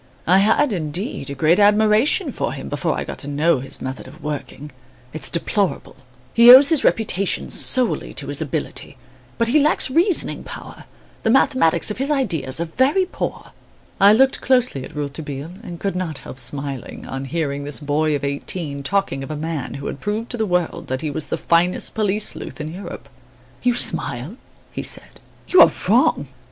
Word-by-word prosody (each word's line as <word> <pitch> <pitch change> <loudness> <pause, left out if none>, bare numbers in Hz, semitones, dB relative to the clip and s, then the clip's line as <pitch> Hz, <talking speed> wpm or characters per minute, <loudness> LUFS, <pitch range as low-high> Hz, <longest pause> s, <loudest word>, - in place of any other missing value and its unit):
I 185 +3 +5
had, 225 +6 +3
indeed, 165 - -3
a 140 - -5
great 155 +7 +3
admiration 210 +5 +3
for - - -3
him, - - -7
before - - -1
I - - -2
got - - -8
to 145 - -3
know 145 +1 +1
his 135 +1 -7
method 130 0 -6
of 135 +4 -14
working. 150 0 -6 0.4
It's 150 -4 -2
deplorable. 185 0 -1 0.4
He 235 +1 +7
owes 270 +3 +9
his 320 -4 +2
reputation 200 -3 0
solely 255 -3 +2
to - - -2
his - - -2
ability; - - -5 0.4
but 230 0 +1
he 300 +5 +4
lacks 295 -2 +2
reasoning 340 +5 +2
power, - - -10 0.4
the - - 0
mathematics 220 - +3
of 210 - -6
his 270 +2 -1
ideas 165 - -1
are 170 - -1
very 265 - +2
poor." 365 - -6 0.5
I 200 +1 +7
looked 265 +5 +3
closely 250 - +1
at 155 - -11
Rouletabille 145 +1 -5
and 170 -1 -9
could 195 -1 -2
not 175 -5 -3
help 130 - -10
smiling, 140 +1 -4
on 135 +1 -5
hearing 145 -2 -3
this 145 0 -2
boy 150 +1 0
of 140 - -4
eighteen 140 +1 -3
talking 180 -3 -1
of 135 - -8
a 155 - -4
man 150 -3 -4
who 140 0 -7
had - - -5
proved 215 +3 -3
to 240 - -4
the 220 -1 -1
world 180 -2 -1
that 130 +1 -3
he 155 - -3
was 155 +1 -4
the - - -2
finest 170 +2 +1
police 210 -1 0
sleuth - - -7
in 155 +1 -5
Europe. 175 -8 -8 0.5
"You 245 -1 +2
smile," 165 - 0 0.3
he - - -5
said? - - -6 0.3
"you 370 - +6
are - - +8 0.2
wrong! 210 - +3
170 Hz, 185 wpm, -20 LUFS, 145-220 Hz, 0.5 s, owes